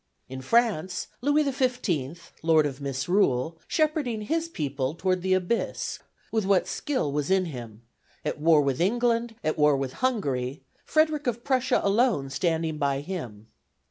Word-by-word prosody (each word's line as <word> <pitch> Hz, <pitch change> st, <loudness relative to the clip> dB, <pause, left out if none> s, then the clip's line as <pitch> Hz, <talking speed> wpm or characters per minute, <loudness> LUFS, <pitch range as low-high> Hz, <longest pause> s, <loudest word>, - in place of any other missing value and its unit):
In 130 Hz, 0 st, -7 dB
France, 185 Hz, -, +1 dB
Louis 290 Hz, +3 st, +3 dB
XV., 230 Hz, -, -2 dB
Lord 160 Hz, -2 st, +4 dB
of 140 Hz, -1 st, -4 dB
Misrule, 140 Hz, +1 st, 0 dB
shepherding 300 Hz, -8 st, 0 dB
his 330 Hz, +8 st, -1 dB
people 140 Hz, -, -2 dB
toward 185 Hz, +1 st, 0 dB
the 185 Hz, +1 st, +2 dB
Abyss 185 Hz, +5 st, -2 dB, 0.3 s
with 220 Hz, -1 st, +1 dB
what 190 Hz, -2 st, +2 dB
skill 260 Hz, -, -1 dB
was 145 Hz, 0 st, -1 dB
in 190 Hz, -1 st, +3 dB
him; 120 Hz, -7 st, -8 dB, 0.4 s
at 150 Hz, -, -2 dB
war 155 Hz, 0 st, +5 dB
with 140 Hz, +1 st, 0 dB
England, 230 Hz, +3 st, +1 dB
at 155 Hz, 0 st, -1 dB
war 150 Hz, -1 st, +5 dB
with 135 Hz, -1 st, -3 dB
Hungary; 140 Hz, -, -1 dB, 0.2 s
Frederick 310 Hz, -2 st, +2 dB
of 235 Hz, 0 st, -1 dB
Prussia 260 Hz, -2 st, +2 dB
alone 200 Hz, -, +2 dB
standing 160 Hz, 0 st, -1 dB
by 140 Hz, -1 st, 0 dB
him. 125 Hz, -, -6 dB
175 Hz, 145 wpm, -26 LUFS, 140-235 Hz, 0.4 s, war